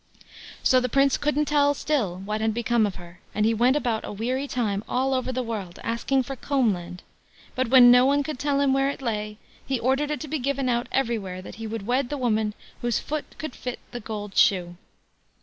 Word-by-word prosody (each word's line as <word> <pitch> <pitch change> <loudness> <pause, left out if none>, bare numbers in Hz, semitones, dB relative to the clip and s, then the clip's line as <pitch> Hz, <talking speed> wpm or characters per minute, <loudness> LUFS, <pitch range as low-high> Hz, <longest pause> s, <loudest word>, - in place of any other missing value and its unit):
So 255 - +5
the 250 0 -1
Prince 275 +2 +3
couldn't 300 0 0
tell 285 -1 +3
still 205 -14 -1
what 215 +1 -2
had 220 -1 0
become 235 -2 +2
of 195 - -6
her, 175 -1 -12 0.2
and 210 - +2
he 225 - +3
went 245 +4 +3
about 240 -7 0
a - - -6
weary 250 +7 -2
time 215 -6 -1
all 265 +1 +1
over 260 0 -1
the 255 0 -2
world 210 -7 -5
asking 255 +3 0
for 270 +2 -6
"Combland"; 195 -11 -1 0.5
but 255 0 0
when 245 0 +8
no 250 0 +7
one 285 +1 +3
could 290 -2 -5
tell 285 -1 +1
him 275 -1 +3
where 270 0 +2
it 280 - -6
lay, 210 -3 -3 0.3
he 265 -2 -2
ordered 270 +4 +1
it 300 - -2
to 310 - -5
be 310 +1 -2
given 275 0 -1
out 240 0 0
everywhere 210 -8 -1
that - - -10
he 225 - -4
would 220 -2 -5
wed 250 +2 0
the 290 - -3
woman 220 -4 0 0.3
whose 240 -2 +1
foot 305 0 -5
could 310 -4 -5
fit 250 -1 -5
the 245 - -5
gold 210 -3 -6
shoe. 175 -3 +3
245 Hz, 220 wpm, -25 LUFS, 215-270 Hz, 0.5 s, when